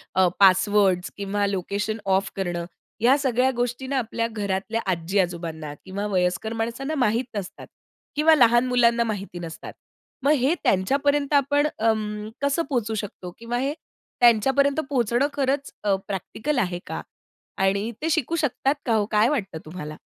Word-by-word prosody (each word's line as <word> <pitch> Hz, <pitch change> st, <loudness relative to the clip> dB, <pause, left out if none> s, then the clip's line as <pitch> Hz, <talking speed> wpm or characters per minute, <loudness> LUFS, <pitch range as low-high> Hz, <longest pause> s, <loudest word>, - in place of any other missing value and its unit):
अ, 185 Hz, 0 st, +5 dB
passwords 190 Hz, -1 st, +4 dB
किंवा 200 Hz, 0 st, -1 dB
location 200 Hz, +3 st, -2 dB
of 195 Hz, 0 st, +1 dB
करणं. 175 Hz, -3 st, -2 dB, 0.4 s
या 255 Hz, +4 st, +5 dB
सगळ्या 260 Hz, -2 st, +2 dB
गोष्टींना 245 Hz, +3 st, -2 dB
आपल्या 230 Hz, -1 st, -1 dB
घरातल्या 210 Hz, 0 st, -2 dB
आजी-आजोबांना 170 Hz, -3 st, -2 dB
किंवा 195 Hz, +2 st, -4 dB
वयस्कर 185 Hz, +3 st, 0 dB
माणसांना 235 Hz, +7 st, -3 dB
माहित 245 Hz, -2 st, +1 dB
नसतात. 195 Hz, -3 st, -6 dB, 0.5 s
किंवा 310 Hz, +2 st, +5 dB
लहान 240 Hz, -3 st, +5 dB
मुलांना 235 Hz, -1 st, +3 dB
माहिती 200 Hz, -5 st, -4 dB
नसतात. 165 Hz, -1 st, -8 dB, 0.5 s
मग 280 Hz, -, +4 dB
हे 265 Hz, +6 st, +3 dB
त्यांच्यापर्यंत 280 Hz, +9 st, +1 dB
आपण 285 Hz, +1 st, +3 dB
अं, 215 Hz, -1 st, 0 dB
कसं 280 Hz, +4 st, +1 dB
पोहचू 235 Hz, -5 st, -1 dB
शकतो? 195 Hz, -4 st, -6 dB
किंवा 235 Hz, +1 st, -3 dB
हे 275 Hz, +3 st, -1 dB, 0.5 s
त्यांच्यापर्यंत 265 Hz, +5 st, +4 dB
पोहचणं 245 Hz, 0 st, +2 dB
खरंच 280 Hz, 0 st, -1 dB
अ, 200 Hz, -2 st, +3 dB
प्रॅक्टिकल 215 Hz, -, -3 dB
आहे 180 Hz, -5 st, -1 dB
का? -, -, -4 dB, 0.6 s
आणि 200 Hz, +4 st, +1 dB
ते 320 Hz, -, 0 dB
शिकू 320 Hz, 0 st, 0 dB
शकतात 290 Hz, -2 st, 0 dB
का 235 Hz, -, +1 dB
हो 210 Hz, -2 st, +2 dB
काय 215 Hz, +2 st, +4 dB
वाटतं 205 Hz, -, -2 dB
तुम्हाला? 155 Hz, -2 st, -7 dB
225 Hz, 145 wpm, -24 LUFS, 195-265 Hz, 0.6 s, अ